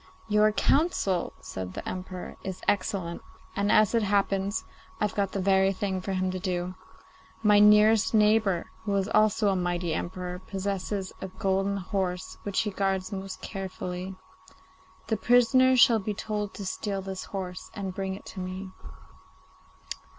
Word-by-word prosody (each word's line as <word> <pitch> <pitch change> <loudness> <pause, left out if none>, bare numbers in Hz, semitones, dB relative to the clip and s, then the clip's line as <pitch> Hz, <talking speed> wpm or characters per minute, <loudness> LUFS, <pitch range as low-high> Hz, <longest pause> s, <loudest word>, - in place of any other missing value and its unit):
'Your 210 0 +4
counsel,' 210 - +1
said 95 -1 -6
the - - -6
Emperor, 185 0 -6
'is 190 -1 -6
excellent, 185 -4 0 0.3
and, 200 +1 +1
as 215 0 +5
it 230 - +3
happens, 200 0 0 0.3
I've 210 -2 0
got 200 -2 0
the 195 - -1
very 190 0 +3
thing 190 -1 -2
for 195 +1 -3
him 185 0 0
to 185 - -4
do. 180 -1 -2 0.7
My 210 -1 +6
nearest 210 +1 +6
neighbour, 210 -4 +3
who 205 -2 -1
is 195 0 +1
also 215 -1 +3
a 195 - +2
mighty 175 -2 -1
Emperor, 180 +2 -4
possesses 195 0 -3
a 190 - -3
golden 195 +1 0
horse 185 -1 -3
which 200 -2 0
he 210 - -2
guards 195 0 -1
most 190 -1 -6
carefully. 185 -1 -5 0.9
The 220 - 0
prisoner 250 +3 +5
shall 230 -1 +6
be 210 +1 -3
told 210 -1 -3
to 200 - -6
steal 195 +1 -3
this 190 -1 -5
horse 185 -2 -6
and 195 -3 -4
bring 190 0 -3
it 195 - -12
to - - -7
me. 185 +1 -5
195 Hz, 155 wpm, -28 LUFS, 185-210 Hz, 0.9 s, My